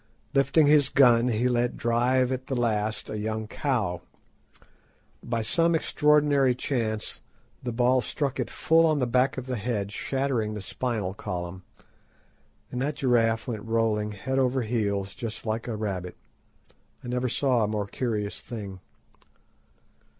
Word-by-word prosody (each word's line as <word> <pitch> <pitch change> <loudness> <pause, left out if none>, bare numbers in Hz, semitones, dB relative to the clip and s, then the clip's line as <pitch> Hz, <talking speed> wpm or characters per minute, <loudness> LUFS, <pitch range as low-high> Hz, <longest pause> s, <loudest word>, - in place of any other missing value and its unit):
Lifting 140 +3 +4
his 145 -2 +5
gun, 120 -3 +5
he 120 +1 +1
let 120 -1 0
drive 125 +2 +2
at 130 0 -3
the 135 - -2
last, 110 -3 0
a 105 - -4
young 110 +1 -2
cow. 110 - -1 1.2
By 115 -1 -2
some 165 +10 +3
extraordinary 150 -4 +3
chance 115 -5 -2 0.4
the 125 - -3
ball 125 +2 +3
struck 140 +4 -2
it - - -1
full 165 +1 +3
on 155 -1 +2
the 130 - +1
back 125 +3 +2
of 130 - -4
the 130 -2 -3
neck, 105 -2 -2
shattering 125 -3 -1
the 105 - -5
spinal 105 -2 -3
column, 90 -2 -5 1.1
and 125 - -3
that 145 +2 -1
giraffe 115 -4 +2
went 110 -4 -3
rolling 110 -2 0
head 130 +6 -2
over 130 -1 +1
heels 100 -4 -1
just 115 -1 -6
like 110 +1 -2
a 115 - -2
rabbit. 95 -4 -4 0.9
I - - -8
never 125 +1 -1
saw 125 -2 +2
a - - +1
more 105 -1 -2
curious 105 -1 -3
thing. 100 -6 -7
120 Hz, 150 wpm, -27 LUFS, 105-130 Hz, 1.2 s, his